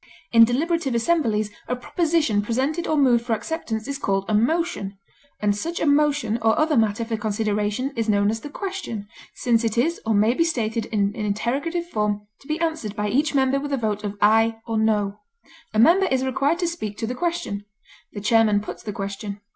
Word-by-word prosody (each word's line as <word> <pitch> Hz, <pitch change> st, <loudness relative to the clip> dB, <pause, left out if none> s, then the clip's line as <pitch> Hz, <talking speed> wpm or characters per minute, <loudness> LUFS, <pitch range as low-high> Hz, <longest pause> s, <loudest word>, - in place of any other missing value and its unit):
In 230 Hz, -1 st, +8 dB
deliberative 280 Hz, +2 st, 0 dB
assemblies 230 Hz, -6 st, +1 dB, 0.2 s
a 250 Hz, -, -1 dB
proposition 305 Hz, -, +1 dB
presented 265 Hz, +10 st, -1 dB
or 310 Hz, -, +1 dB
moved 250 Hz, -4 st, +4 dB
for 235 Hz, -1 st, -1 dB
acceptance 225 Hz, -2 st, -3 dB
is 280 Hz, -1 st, -4 dB
called 195 Hz, -5 st, 0 dB
a 215 Hz, -, -1 dB
motion, 230 Hz, -, 0 dB, 0.4 s
and 205 Hz, -1 st, +1 dB
such 335 Hz, -, -3 dB
a -, -, 0 dB
motion 285 Hz, -6 st, +2 dB
or 220 Hz, 0 st, +3 dB
other 310 Hz, 0 st, +2 dB
matter 220 Hz, 0 st, +1 dB
for 225 Hz, -1 st, -2 dB
consideration 210 Hz, +4 st, -1 dB
is 225 Hz, -2 st, -1 dB
known 205 Hz, 0 st, +3 dB
as 225 Hz, -, -3 dB
the 290 Hz, -, -8 dB
question, 370 Hz, -, -5 dB, 0.3 s
since 235 Hz, -1 st, +1 dB
it 225 Hz, 0 st, -1 dB
is 325 Hz, +8 st, +1 dB
or 220 Hz, -1 st, +1 dB
may 215 Hz, +3 st, +4 dB
be 330 Hz, -, +2 dB
stated 230 Hz, -8 st, -1 dB
in 205 Hz, -2 st, 0 dB
interrogative 240 Hz, +11 st, -1 dB
form 210 Hz, -8 st, -1 dB
to 275 Hz, -, -18 dB
be 310 Hz, +2 st, -2 dB
answered 315 Hz, -11 st, -2 dB
by 210 Hz, -1 st, -1 dB
each 290 Hz, +6 st, +1 dB
member 265 Hz, 0 st, +3 dB
with 290 Hz, +1 st, -5 dB
a -, -, +2 dB
vote 215 Hz, -3 st, -2 dB
of 205 Hz, -1 st, -4 dB
"aye" 225 Hz, +2 st, +4 dB
or 225 Hz, -1 st, -1 dB
"no;" 210 Hz, -2 st, +1 dB, 0.5 s
a 215 Hz, -, -3 dB
member 350 Hz, -, +5 dB
is 265 Hz, 0 st, +1 dB
required 275 Hz, +5 st, +1 dB
to 350 Hz, -1 st, 0 dB
speak 215 Hz, -12 st, -4 dB
to -, -, -2 dB
the 240 Hz, -, -3 dB
question; 250 Hz, -10 st, -3 dB, 0.5 s
the 205 Hz, -, -6 dB
chairman 215 Hz, -1 st, +4 dB
puts 210 Hz, -, -7 dB
the 210 Hz, -, -5 dB
question. 200 Hz, 0 st, -5 dB
230 Hz, 200 wpm, -23 LUFS, 210-290 Hz, 0.5 s, In